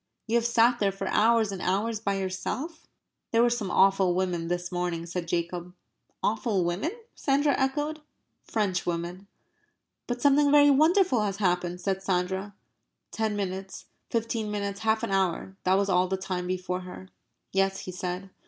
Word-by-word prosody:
"You 225 Hz, -, -4 dB
have 235 Hz, 0 st, +1 dB
sat 235 Hz, +1 st, +4 dB
there 200 Hz, -1 st, +2 dB
for 195 Hz, 0 st, -5 dB
hours 225 Hz, -1 st, +3 dB
and 190 Hz, -2 st, -5 dB
hours 210 Hz, +4 st, 0 dB
by 200 Hz, -2 st, -1 dB
yourself?" 210 Hz, -, -4 dB, 0.4 s
"There 230 Hz, +1 st, +4 dB
were 240 Hz, -, +3 dB
some 225 Hz, -5 st, -2 dB
awful 190 Hz, -1 st, +4 dB
women 180 Hz, -3 st, -1 dB
this 175 Hz, 0 st, -2 dB
morning," 175 Hz, -2 st, -2 dB
said 175 Hz, 0 st, -4 dB
Jacob. 175 Hz, +1 st, -3 dB, 0.5 s
"Awful 215 Hz, -4 st, +1 dB
women?" 175 Hz, -, -1 dB, 0.2 s
Sandra 285 Hz, +1 st, +2 dB
echoed. 295 Hz, +3 st, -1 dB, 0.4 s
"Frenchwomen." 180 Hz, -2 st, -2 dB, 0.8 s
"But 245 Hz, 0 st, -2 dB
something 285 Hz, +2 st, +4 dB
very 290 Hz, 0 st, +7 dB
wonderful 315 Hz, -, +4 dB
has 200 Hz, -2 st, -1 dB
happened," 180 Hz, -2 st, 0 dB
said 190 Hz, 0 st, -1 dB
Sandra. 190 Hz, +1 st, -1 dB, 0.6 s
Ten 220 Hz, -1 st, -1 dB
minutes, 190 Hz, -1 st, -4 dB, 0.2 s
fifteen 230 Hz, -1 st, -1 dB
minutes, 200 Hz, -1 st, -3 dB
half 220 Hz, 0 st, +1 dB
an -, -, -2 dB
hour 190 Hz, 0 st, 0 dB
that 185 Hz, +1 st, +4 dB
was 200 Hz, 0 st, +1 dB
all 185 Hz, -1 st, +3 dB
the 190 Hz, +1 st, -1 dB
time 185 Hz, -1 st, -3 dB
before 180 Hz, 0 st, -2 dB
her. 185 Hz, +1 st, -10 dB, 0.4 s
"Yes," 195 Hz, 0 st, +1 dB
he 185 Hz, -, -6 dB
said. 180 Hz, +1 st, -5 dB
195 Hz, 160 wpm, -27 LUFS, 180-230 Hz, 0.8 s, very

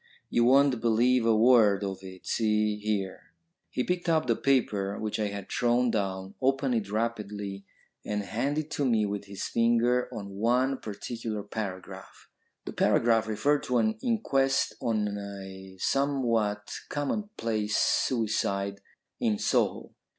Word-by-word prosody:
You 120 Hz, -, +3 dB
won't 135 Hz, -1 st, +4 dB
believe 120 Hz, +1 st, +3 dB
a 115 Hz, -, +5 dB
word 110 Hz, -4 st, +5 dB
of 95 Hz, -1 st, -3 dB
it. 95 Hz, -1 st, -11 dB
See 105 Hz, -1 st, +1 dB
here." 105 Hz, +7 st, -3 dB, 0.4 s
He 125 Hz, -, -1 dB
picked 180 Hz, +1 st, -1 dB
up 160 Hz, -3 st, +3 dB
the 115 Hz, -2 st, +2 dB
paper 105 Hz, -8 st, +1 dB
which 110 Hz, 0 st, -3 dB
I 105 Hz, -, +1 dB
had 100 Hz, -1 st, -6 dB
thrown 120 Hz, 0 st, +2 dB
down, 95 Hz, -2 st, -2 dB
opened 135 Hz, 0 st, +1 dB
it 110 Hz, -4 st, -1 dB
rapidly, 105 Hz, -3 st, -3 dB, 0.4 s
and 105 Hz, -1 st, -2 dB
handed 140 Hz, +9 st, -1 dB
it 155 Hz, -, -24 dB
to 145 Hz, -1 st, -1 dB
me 115 Hz, -4 st, +2 dB
with 100 Hz, 0 st, -4 dB
his 100 Hz, -1 st, -7 dB
finger 120 Hz, +2 st, +2 dB
on 100 Hz, -2 st, -7 dB
one 125 Hz, +5 st, +1 dB
particular 110 Hz, 0 st, -5 dB
paragraph. 100 Hz, -3 st, -7 dB, 0.4 s
The -, -, -6 dB
paragraph 115 Hz, -1 st, +3 dB
referred 140 Hz, +7 st, +1 dB
to 125 Hz, -1 st, +1 dB
an 110 Hz, -1 st, +2 dB
inquest 135 Hz, -, +1 dB
on 105 Hz, -3 st, -1 dB
a 95 Hz, -1 st, -9 dB
somewhat 115 Hz, -5 st, 0 dB, 0.2 s
commonplace 115 Hz, -, -2 dB
suicide 100 Hz, -4 st, 0 dB, 0.4 s
in 110 Hz, -2 st, +1 dB
Soho. -, -, 0 dB
110 Hz, 140 wpm, -28 LUFS, 100-125 Hz, 0.4 s, a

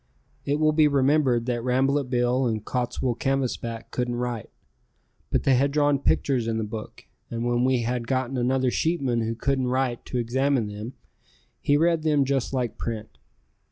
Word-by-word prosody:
It 145 Hz, +1 st, 0 dB
will 155 Hz, 0 st, +4 dB
be 155 Hz, 0 st, +4 dB
remembered 135 Hz, -3 st, +2 dB
that 120 Hz, -2 st, -2 dB
Rambolet 135 Hz, +2 st, +1 dB
Bill 125 Hz, +1 st, +1 dB
and 110 Hz, -2 st, -2 dB
Cottswool 125 Hz, -1 st, -2 dB
Canvasback 125 Hz, -4 st, -2 dB
couldn't 125 Hz, -1 st, -1 dB
write, 120 Hz, -2 st, -3 dB, 0.8 s
but -, -, 0 dB
they 135 Hz, -, +4 dB
had 135 Hz, +3 st, +3 dB
drawn 145 Hz, -1 st, +2 dB
pictures 130 Hz, -3 st, +1 dB
in 115 Hz, -1 st, -1 dB
the 110 Hz, -, -1 dB
book, 110 Hz, 0 st, -7 dB, 0.2 s
and 115 Hz, 0 st, -3 dB
when 120 Hz, 0 st, +1 dB
we 130 Hz, -2 st, +2 dB
had 120 Hz, 0 st, -2 dB
gotten 130 Hz, 0 st, -1 dB
another 130 Hz, +1 st, +1 dB
sheepman 135 Hz, -8 st, 0 dB
who 115 Hz, +1 st, -2 dB
couldn't 130 Hz, +2 st, 0 dB
write 125 Hz, -1 st, -1 dB
to 125 Hz, -, -4 dB
examine 130 Hz, +1 st, +1 dB
them 105 Hz, +4 st, -7 dB, 0.7 s
he 145 Hz, -, +2 dB
read 165 Hz, +1 st, +2 dB
them 150 Hz, -3 st, +2 dB
just 135 Hz, -2 st, 0 dB
like 125 Hz, -4 st, -2 dB
print. 110 Hz, -2 st, -5 dB
125 Hz, 170 wpm, -25 LUFS, 120-140 Hz, 0.8 s, will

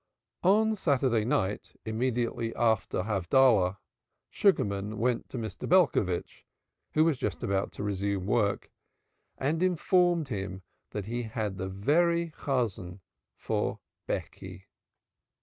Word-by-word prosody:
On 215 Hz, +4 st, +4 dB
Saturday 135 Hz, -, +1 dB
night 105 Hz, -3 st, -1 dB
immediately 115 Hz, 0 st, -1 dB
after 110 Hz, -5 st, +1 dB
Havdalah, 100 Hz, 0 st, +3 dB, 0.5 s
Sugarman 105 Hz, -, +1 dB
went 125 Hz, 0 st, 0 dB
to -, -, -6 dB
Mr. 110 Hz, -2 st, -5 dB
Belcovitch, 140 Hz, -, +2 dB, 0.5 s
who 155 Hz, +1 st, +5 dB
was 155 Hz, -6 st, +1 dB
just 105 Hz, -, -3 dB
about 100 Hz, 0 st, 0 dB
to -, -, -6 dB
resume 100 Hz, -1 st, -1 dB
work, 100 Hz, -1 st, 0 dB, 0.7 s
and 155 Hz, +5 st, -1 dB
informed 175 Hz, -3 st, +2 dB
him 95 Hz, -4 st, -4 dB, 0.3 s
he 110 Hz, +4 st, -3 dB
had 110 Hz, -4 st, -4 dB
the 95 Hz, -, -2 dB
very 170 Hz, -, +1 dB
Chosan 105 Hz, -11 st, -2 dB, 0.3 s
for -, -, -2 dB, 0.3 s
Becky. 95 Hz, 0 st, -5 dB
115 Hz, 110 wpm, -29 LUFS, 100-145 Hz, 0.7 s, who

